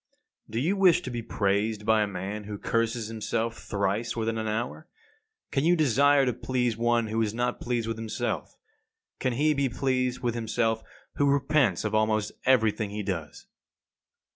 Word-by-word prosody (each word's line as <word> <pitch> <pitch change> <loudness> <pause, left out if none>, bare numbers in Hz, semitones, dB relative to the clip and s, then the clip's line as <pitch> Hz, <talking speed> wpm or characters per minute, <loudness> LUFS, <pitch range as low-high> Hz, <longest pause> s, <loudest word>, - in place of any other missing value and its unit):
53. - - -16
Do 120 +5 0
you 195 - +2
wish 185 -4 +5
to 130 - -5
be 120 -1 -3
praised 105 0 0
by 110 0 +4
a 105 - +1
man 100 +2 -5
who 105 0 -5
curses 115 +1 0
himself 115 +1 -2
thrice 100 +2 -1
within 115 -1 -1
an 110 - -2
hour? 120 +9 -3 0.6
Can 135 - +1
you 175 +2 +4
desire 145 -1 +4
to 125 - +1
please 125 -1 -1
one 120 0 +2
who 110 +1 -1
is 110 -1 -1
not 125 +1 -1
pleased 120 -2 -1
with 115 -1 -3
himself? 110 -1 -3 0.6
Can 130 - 0
he 150 +5 +2
be 140 -2 0
pleased 125 0 -1
with 120 -2 0
himself 115 -1 0 0.4
who 140 0 +3
repents 140 - +2
of 110 - -1
almost 110 -1 +1 0.2
everything 110 -4 +3
he 105 +1 -4
does? 85 -6 -5
115 Hz, 175 wpm, -27 LUFS, 110-125 Hz, 0.6 s, wish